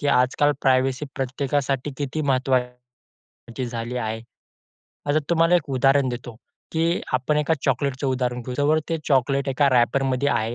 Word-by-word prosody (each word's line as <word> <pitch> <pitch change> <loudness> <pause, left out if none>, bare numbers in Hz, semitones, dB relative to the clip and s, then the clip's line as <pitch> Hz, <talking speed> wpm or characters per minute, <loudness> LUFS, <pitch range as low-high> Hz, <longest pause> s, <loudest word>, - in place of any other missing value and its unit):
की 145 - -2
आजकाल 140 +2 +3
प्रायव्हसी 130 +2 +2
प्रत्येकासाठी 135 +1 -1
किती 145 +2 -3
महत्त्वाची 125 -2 -1 0.7
झाली 120 +1 -4
आहे. 110 -1 -3 0.9
आता 145 +2 +2
तुम्हाला 165 +1 +4
एक 145 -4 -3
उदाहरण 135 +1 +3
देतो, 120 -1 -6 0.4
की 165 +2 +1
आपण 130 +4 +1
एका 150 +2 +2
चॉकलेटचं 135 +1 0
उदाहरण 125 -2 -1
घेऊ 125 +1 -6
जवळ 155 +2 +3
ते 165 -1 -1
चॉकलेट 135 0 +2
एका 140 +1 +2
रॅपरमध्ये 130 +2 +2
आहे, 115 -1 0
135 Hz, 140 wpm, -23 LUFS, 125-145 Hz, 0.9 s, तुम्हाला